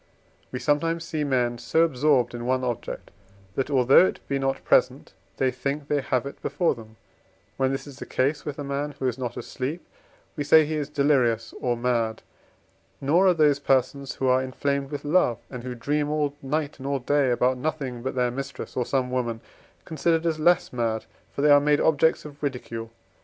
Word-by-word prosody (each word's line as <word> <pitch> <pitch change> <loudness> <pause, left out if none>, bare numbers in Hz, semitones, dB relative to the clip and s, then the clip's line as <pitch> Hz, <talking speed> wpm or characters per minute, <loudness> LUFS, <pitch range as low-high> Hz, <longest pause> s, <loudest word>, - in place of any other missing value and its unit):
We 125 - -3
sometimes 165 +4 0
see 160 -2 -3
men 125 -4 0
so 160 +6 +2
absorbed 145 -5 +2
in 120 0 -5
one 130 0 +1
object, 120 -2 -4 0.4
that, 135 +6 -2
although 135 +6 +6
it - - -5
be 140 0 -1
not 135 0 -1
present, - - +2 0.2
they 130 -1 +2
think 140 +2 -4
they 145 -1 +1
have 130 -1 -1
it 140 - -8
before 175 - +1
them; 110 -3 -13 0.6
when 130 0 +1
this 135 - -3
is 140 -2 -12
the - - -7
case 140 +4 0
with 145 -2 -5
a 145 - -4
man 140 +1 -3
who 130 - -1
is 125 0 -2
not 120 -2 -4
asleep, 145 +7 -5 0.5
we 145 - -2
say 155 +2 +6
he 155 - -3
is 150 -2 -2
delirious 130 -6 +1
or 120 -1 0
mad; 115 -2 -1 0.8
nor 165 +8 +3
are 180 - +4
those 150 -3 +4
persons 135 0 0
who 135 - -2
are 130 0 +4
inflamed 140 +1 -2
with 145 0 -6
love, 145 -7 +3
and 125 -2 -6
who 125 -1 -5
dream 145 +5 -1
all 150 -2 0
night 145 +2 -2
and 135 - -6
all 140 0 0
day 140 +1 +1
about 125 +1 +1
nothing 135 -4 -3
but 130 +2 -4
their 125 -1 +1
mistress, 135 +1 -6
or 125 - -1
some 130 -2 0
woman, 120 -3 -1 0.5
considered 165 +1 0
as 160 -2 0
less 175 -1 +3
mad, 115 -2 -1 0.3
for 140 - -3
they 150 - +6
are 145 - +8
made 145 0 +3
objects 160 0 +2
of 145 -1 -11
ridicule. 120 -5 -4
140 Hz, 200 wpm, -25 LUFS, 125-150 Hz, 0.8 s, are